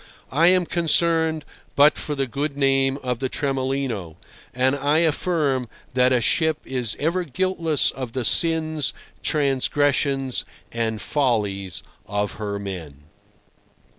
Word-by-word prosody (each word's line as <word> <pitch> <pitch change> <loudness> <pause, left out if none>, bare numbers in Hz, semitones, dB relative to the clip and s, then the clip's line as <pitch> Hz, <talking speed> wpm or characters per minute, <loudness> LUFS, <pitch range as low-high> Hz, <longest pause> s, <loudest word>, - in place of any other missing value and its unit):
I 160 +5 +4
am 180 0 +4
concerned 165 -2 +1 0.3
but 145 +2 +6
for 150 - -3
the 135 -1 0
good 140 +4 -3
name 135 -1 +2
of 125 -2 -2
the 130 - -2
Tremolino, 130 - -2 0.4
and 130 +2 +1
I 145 +2 +1
affirm 150 -6 +1 0.2
that 125 0 +3
a 125 - +4
ship 160 +8 +2
is 125 -5 -1
ever 170 +5 0
guiltless 165 0 0
of 130 -3 -6
the 130 -3 -2
sins, 160 -2 +2 0.3
transgressions, 140 -1 +1 0.3
and 115 -2 -2
follies 105 - -1 0.2
of 100 0 -1
her 100 -1 -3
men. 85 -8 -7
135 Hz, 125 wpm, -23 LUFS, 120-155 Hz, 0.4 s, but